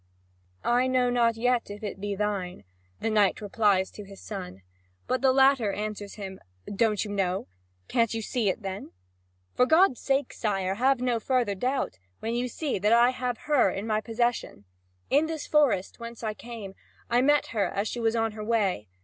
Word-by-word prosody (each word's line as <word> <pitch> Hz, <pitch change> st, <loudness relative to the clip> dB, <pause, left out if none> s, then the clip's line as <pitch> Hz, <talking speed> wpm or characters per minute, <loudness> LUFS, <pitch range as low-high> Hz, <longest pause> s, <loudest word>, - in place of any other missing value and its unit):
"I 245 Hz, +2 st, +3 dB
know 255 Hz, -1 st, +2 dB
not 235 Hz, -2 st, +3 dB
yet 245 Hz, 0 st, +1 dB
if 205 Hz, +1 st, -8 dB
it 200 Hz, -2 st, -5 dB
be 205 Hz, 0 st, -2 dB
thine," 195 Hz, -, -3 dB, 0.4 s
the -, -, 0 dB
knight 210 Hz, -3 st, +3 dB
replies 205 Hz, -2 st, +1 dB
to 210 Hz, -, -9 dB
his 195 Hz, 0 st, -12 dB
son. 180 Hz, -, -7 dB, 0.4 s
But 255 Hz, -, -1 dB
the 265 Hz, -1 st, +5 dB
latter 265 Hz, -5 st, +4 dB
answers 210 Hz, -1 st, -5 dB
him: 190 Hz, -2 st, -7 dB, 0.3 s
"Don't 210 Hz, +1 st, +1 dB
you 205 Hz, -, -6 dB
know? 190 Hz, -2 st, -1 dB, 0.4 s
Can't 230 Hz, -2 st, +2 dB
you 225 Hz, -1 st, -3 dB
see 225 Hz, -2 st, 0 dB
it, 190 Hz, -, -3 dB
then? 195 Hz, -, -6 dB, 0.6 s
For 250 Hz, -, +3 dB
God's 320 Hz, -3 st, +4 dB
sake, 275 Hz, -1 st, 0 dB
sire, 195 Hz, -4 st, -1 dB
have 255 Hz, +4 st, +2 dB
no 245 Hz, -2 st, +1 dB
further 245 Hz, -3 st, +1 dB
doubt, 250 Hz, -, -2 dB, 0.2 s
when 225 Hz, +1 st, -3 dB
you 245 Hz, +1 st, 0 dB
see 270 Hz, -2 st, -3 dB
that 210 Hz, +4 st, +3 dB
I 240 Hz, +1 st, +6 dB
have 250 Hz, -2 st, -3 dB
her 295 Hz, -1 st, +4 dB
in 195 Hz, -, -4 dB
my 215 Hz, -1 st, 0 dB
possession. 230 Hz, -, -2 dB, 0.5 s
In 295 Hz, +3 st, +4 dB
this 320 Hz, -2 st, -4 dB
forest, 280 Hz, -12 st, +2 dB
whence 235 Hz, 0 st, -8 dB
I 215 Hz, -1 st, -1 dB
come, 220 Hz, -4 st, -8 dB, 0.3 s
I 240 Hz, +1 st, +3 dB
met 290 Hz, +2 st, +3 dB
her 210 Hz, -3 st, +2 dB
as 200 Hz, +2 st, -2 dB
she 240 Hz, -, -4 dB
was 225 Hz, 0 st, +1 dB
on 225 Hz, -1 st, +1 dB
her 215 Hz, 0 st, -7 dB
way. 205 Hz, -, 0 dB
225 Hz, 190 wpm, -27 LUFS, 205-250 Hz, 0.6 s, I